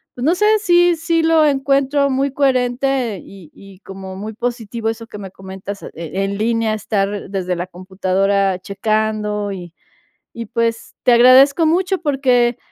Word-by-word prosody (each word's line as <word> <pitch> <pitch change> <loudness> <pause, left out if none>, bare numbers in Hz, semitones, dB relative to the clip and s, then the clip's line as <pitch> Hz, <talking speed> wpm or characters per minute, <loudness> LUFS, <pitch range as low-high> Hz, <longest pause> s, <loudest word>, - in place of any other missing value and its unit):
pues, 245 - -4
no 335 +4 +3
sé, 420 - +1
sí 350 -3 +3
sí 330 0 0
lo 320 -1 +4
encuentro 280 0 +1
muy 270 +1 0
coherente 255 -4 0
y 190 -6 -14
y 195 -1 -15
como 190 -1 -9
muy 215 +3 -6
positivo 230 -1 -3
eso 225 0 -5
que 210 - -10
me 190 -2 -8
comentas, 190 +1 -9
eh, - - -8
en 195 +5 -3
línea 225 0 0
estar 205 -2 -2
desde 185 -2 -2
la 175 +1 -4
computadora 190 +1 0
checando 210 +1 -2
y 175 -3 -8 0.6
y, 230 0 -6
pues, 230 0 -2
te 250 - +4
agradezco 260 +6 +6
mucho, 360 +3 +1
porque, 255 -5 +1
225 Hz, 155 wpm, -18 LUFS, 195-270 Hz, 0.6 s, agradezco